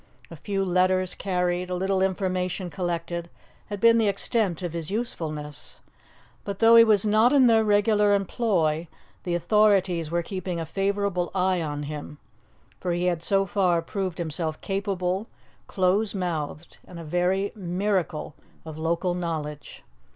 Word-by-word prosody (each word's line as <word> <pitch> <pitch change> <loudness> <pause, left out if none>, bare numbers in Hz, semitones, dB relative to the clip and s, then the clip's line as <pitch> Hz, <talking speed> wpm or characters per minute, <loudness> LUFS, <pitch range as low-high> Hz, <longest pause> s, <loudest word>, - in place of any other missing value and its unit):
A - - -7
few 195 +4 -2
letters 185 0 +2
carried, 180 -1 -1
a 180 - -2
little 190 +1 0
information 185 -1 -1
collected, 170 -1 -3 0.4
had 205 -2 -5
been 230 +1 +5
the 220 - +2
extent 200 -3 -1
of 175 -2 -3
his 165 -2 -5
usefulness. 155 - -5 0.6
But, 200 -1 -5
though 230 +1 +6
he 230 - +10
was 215 -3 +3
not 215 +3 +4
in 275 -3 +5
their 225 -2 +5
regular 205 0 +3
employ, 175 -6 0 0.4
the 175 -1 0
authorities 185 -2 +2
were 170 +1 -1
keeping 185 -1 -4
a 165 - -3
favourable 195 0 -1
eye 185 -1 +1
on 150 -2 -3
him, 150 0 -7 0.6
for 180 -2 -2
he 175 +1 -1
had 175 -2 0
so 195 +3 +2
far 180 -3 +2
proved 190 -1 -4
himself 160 -1 -2
capable, 195 0 -2 0.4
close 195 +3 +1
mouthed, 165 -3 -4
and 175 - -10
a - - -7
very 180 +5 0
miracle 185 -4 -2 0.3
of 155 -1 -8
local 170 +3 0
knowledge. 155 -4 -5
180 Hz, 150 wpm, -25 LUFS, 170-200 Hz, 0.6 s, he